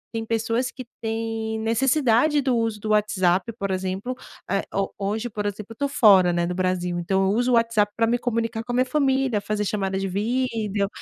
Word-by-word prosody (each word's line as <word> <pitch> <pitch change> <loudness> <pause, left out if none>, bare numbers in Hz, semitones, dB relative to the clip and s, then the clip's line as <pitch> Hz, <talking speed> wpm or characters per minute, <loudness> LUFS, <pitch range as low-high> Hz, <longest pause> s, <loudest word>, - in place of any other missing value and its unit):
tem 225 - -2
pessoas 230 +2 0
que 255 -2 -9 0.2
têm 225 0 -3
necessidade 255 +4 +2
do 265 -3 +1
uso 225 -2 -1
do 215 - -5
WhatsApp, 195 -2 +2
por 195 -3 -2
exemplo, 190 +6 -2 0.3
eh, 195 0 0
ho 195 0 -1
hoje, 210 +4 -2
por 210 -2 -4
exemplo, 205 +1 -5
eu - - -9
tô 280 +4 -1
fora, 195 -9 +5
né, 175 0 0
do 180 - -2
Brasil, 180 -1 -1
então 190 +3 +1
eu 190 - +2
uso 245 +2 +1
o 245 - +4
WhatsApp 230 -3 +2
pra 230 - +3
me 240 +2 +1
comunicar 230 -2 -2
com 245 - -6
a - - 0
minha 255 +1 +3
família, 265 -5 +1
fazer 210 0 -2
chamadas 195 -2 -1
de - - -1
vídeo, 210 0 -1
220 Hz, 205 wpm, -24 LUFS, 195-240 Hz, 0.3 s, fora